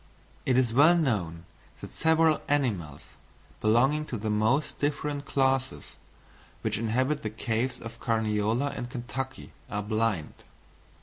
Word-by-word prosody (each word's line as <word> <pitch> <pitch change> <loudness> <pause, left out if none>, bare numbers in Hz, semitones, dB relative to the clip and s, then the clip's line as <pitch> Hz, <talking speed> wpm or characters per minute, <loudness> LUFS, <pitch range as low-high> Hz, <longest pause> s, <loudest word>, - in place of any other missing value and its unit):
It 130 -1 +3
is 125 -3 +2
well 155 +7 +6
known 90 - -1 0.3
that - - -9
several 160 -1 +3
animals, 105 - -1 0.5
belonging 135 +8 +3
to 120 - -3
the 110 0 -2
most 110 +8 +1
different 145 0 -1
classes, 135 -1 0 0.7
which 110 -1 -1
inhabit 130 +6 0
the 110 - -3
caves 115 +3 -2
of 115 0 -9
Carniola 110 +3 0
and 120 - -5
Kentucky, 130 +2 -5 0.2
are 105 0 -2
blind. 110 -6 -1
120 Hz, 125 wpm, -28 LUFS, 110-140 Hz, 0.7 s, well